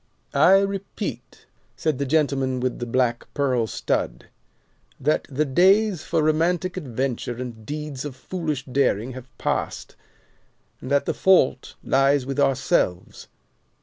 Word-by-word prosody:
"I 150 Hz, +7 st, +6 dB
repeat," 195 Hz, -, -4 dB, 0.3 s
said 155 Hz, -4 st, -1 dB
the 140 Hz, -, -1 dB
gentleman 135 Hz, -3 st, +1 dB
with 125 Hz, 0 st, -2 dB
the 120 Hz, -, -4 dB
black 120 Hz, -1 st, 0 dB
pearl 130 Hz, -5 st, +1 dB
stud, -, -, -2 dB, 0.7 s
"that 150 Hz, +3 st, 0 dB
the 145 Hz, +2 st, 0 dB
days 190 Hz, +5 st, +3 dB
for 165 Hz, -2 st, 0 dB
romantic 170 Hz, +3 st, +1 dB
adventure 130 Hz, -6 st, -3 dB
and 115 Hz, -3 st, -8 dB
deeds 150 Hz, -3 st, -5 dB
of 145 Hz, -3 st, -6 dB
foolish 155 Hz, -3 st, -4 dB
daring 130 Hz, -3 st, 0 dB
have 130 Hz, 0 st, -9 dB
passed, -, -, -3 dB, 0.9 s
and 130 Hz, -, -7 dB
that 140 Hz, 0 st, +2 dB
the -, -, 0 dB
fault 175 Hz, -9 st, +3 dB
lies 135 Hz, 0 st, +3 dB
with 135 Hz, +1 st, -3 dB
ourselves. 130 Hz, -, 0 dB
140 Hz, 130 wpm, -23 LUFS, 125-160 Hz, 0.9 s, I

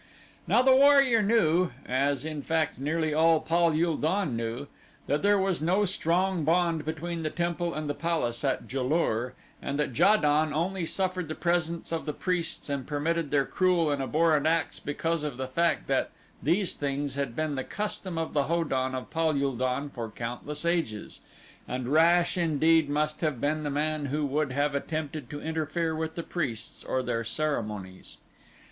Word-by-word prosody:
Now 245 Hz, -, +4 dB
the 260 Hz, 0 st, +6 dB
warrior 275 Hz, -4 st, +6 dB
knew, 185 Hz, -5 st, +3 dB, 0.2 s
as 140 Hz, +2 st, 0 dB
in 155 Hz, -2 st, -4 dB
fact 160 Hz, -2 st, -1 dB
nearly 155 Hz, +2 st, 0 dB
all 160 Hz, +1 st, +4 dB
Pal 170 Hz, +2 st, +2 dB
ul 165 Hz, -2 st, +1 dB
don 165 Hz, -4 st, 0 dB
knew, 115 Hz, +4 st, -3 dB, 0.4 s
that 145 Hz, -, 0 dB
there 205 Hz, +1 st, +4 dB
was 190 Hz, -3 st, 0 dB
no 185 Hz, +6 st, +2 dB
strong 180 Hz, 0 st, +1 dB
bond 165 Hz, 0 st, +1 dB
between 165 Hz, +2 st, -4 dB
the 155 Hz, -, -1 dB
temple 170 Hz, +1 st, -2 dB
and 155 Hz, -1 st, -3 dB
the 145 Hz, -, -1 dB
palace 150 Hz, -8 st, -1 dB
at 135 Hz, -2 st, 0 dB
Ja 135 Hz, -, -1 dB
lur 125 Hz, -4 st, 0 dB, 0.3 s
and 140 Hz, -, -3 dB
that 145 Hz, -5 st, -1 dB
Ja 205 Hz, -, +6 dB
don 150 Hz, -2 st, +2 dB
only 175 Hz, +1 st, -1 dB
suffered 185 Hz, -2 st, -1 dB
the 155 Hz, -, -4 dB
presence 170 Hz, -1 st, -1 dB
of 165 Hz, -1 st, -3 dB
the 150 Hz, -, -1 dB
priests 180 Hz, 0 st, -2 dB
and 140 Hz, -3 st, -3 dB
permitted 155 Hz, +1 st, -1 dB
their 140 Hz, -1 st, +2 dB
cruel 180 Hz, -3 st, +2 dB
and 140 Hz, -1 st, -1 dB
abhorrent 155 Hz, +2 st, +2 dB
acts 165 Hz, -1 st, 0 dB
because 160 Hz, +2 st, -2 dB
of 145 Hz, -5 st, -4 dB
the 130 Hz, -, -3 dB
fact 170 Hz, +6 st, +1 dB
that -, -, 0 dB, 0.3 s
these 175 Hz, +6 st, +2 dB
things 140 Hz, -1 st, -2 dB
had 135 Hz, -4 st, -3 dB
been 155 Hz, -1 st, -1 dB
the 130 Hz, -1 st, -2 dB
custom 205 Hz, -2 st, -3 dB
of 165 Hz, -1 st, -3 dB
the 145 Hz, -2 st, +2 dB
Ho 170 Hz, +2 st, +1 dB
don 130 Hz, -3 st, -1 dB
of 130 Hz, -, -6 dB
Pal 160 Hz, -3 st, +1 dB
ul 140 Hz, -2 st, 0 dB
don 130 Hz, +3 st, -1 dB
for 120 Hz, -5 st, -6 dB
countless 125 Hz, +8 st, -5 dB
ages, 165 Hz, -12 st, -2 dB, 0.5 s
and 125 Hz, 0 st, -3 dB
rash 170 Hz, +4 st, +4 dB
indeed 160 Hz, -1 st, +3 dB
must 150 Hz, +1 st, -1 dB
have 155 Hz, -7 st, -1 dB
been 155 Hz, +3 st, 0 dB
the 150 Hz, -, -2 dB
man 150 Hz, +1 st, -1 dB
who 150 Hz, +2 st, -1 dB
would 145 Hz, 0 st, 0 dB
have 145 Hz, +2 st, 0 dB
attempted 150 Hz, -2 st, -4 dB
to 145 Hz, -, -6 dB
interfere 160 Hz, +1 st, -1 dB
with 160 Hz, 0 st, -3 dB
the 170 Hz, -, -4 dB
priests 135 Hz, -12 st, -3 dB
or 130 Hz, -, -1 dB
their 115 Hz, -2 st, -1 dB
ceremonies. 105 Hz, -9 st, -3 dB
155 Hz, 185 wpm, -28 LUFS, 140-170 Hz, 0.5 s, the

